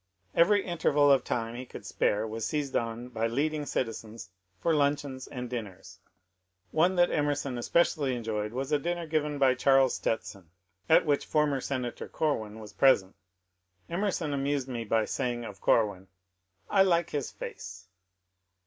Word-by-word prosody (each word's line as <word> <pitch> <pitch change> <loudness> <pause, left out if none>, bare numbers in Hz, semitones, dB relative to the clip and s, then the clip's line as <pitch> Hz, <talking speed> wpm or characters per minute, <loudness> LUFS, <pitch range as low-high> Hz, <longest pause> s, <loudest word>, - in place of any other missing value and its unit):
Every 200 +4 +4
interval 150 -5 +3
of 135 -3 +4
time 115 -1 -2
he 125 +2 -6
could 125 - -11
spare 105 +2 0
was 110 +1 -5
seized 145 0 -2
on 115 +1 -2
by 115 -2 -1
leading 145 +5 -1
citizens 115 -4 -4 0.3
for 165 - +1
luncheons 140 -3 0
and 125 -2 -6
dinners. 95 -6 -7 0.7
One 175 +4 +3
that 175 0 +4
Emerson 145 -3 0
especially 145 -1 +1
enjoyed 110 -3 -3
was 130 +4 -4
a 150 - +3
dinner 175 +3 -2
given 150 -2 -1
by 135 -2 +4
Charles 135 0 +4
Stetson, 100 -6 -3 0.4
at 160 - +6
which 145 -2 +1
former 150 -3 +1
Senator 125 -3 -4
Corwin 110 -9 -1
was 105 -2 -10
present. 100 -4 +3 0.8
Emer 200 +4 0
son 160 -6 -2
amused 140 -1 -1
me 120 -3 -4
by 110 0 +1
saying 120 0 -2
of 100 -3 -9
Corwin, 105 -5 +2
^^ - - -34 0.6
I 195 - +3
like 170 -3 +3
his 145 -3 -2
face." 90 +1 -9
130 Hz, 160 wpm, -29 LUFS, 115-150 Hz, 0.8 s, at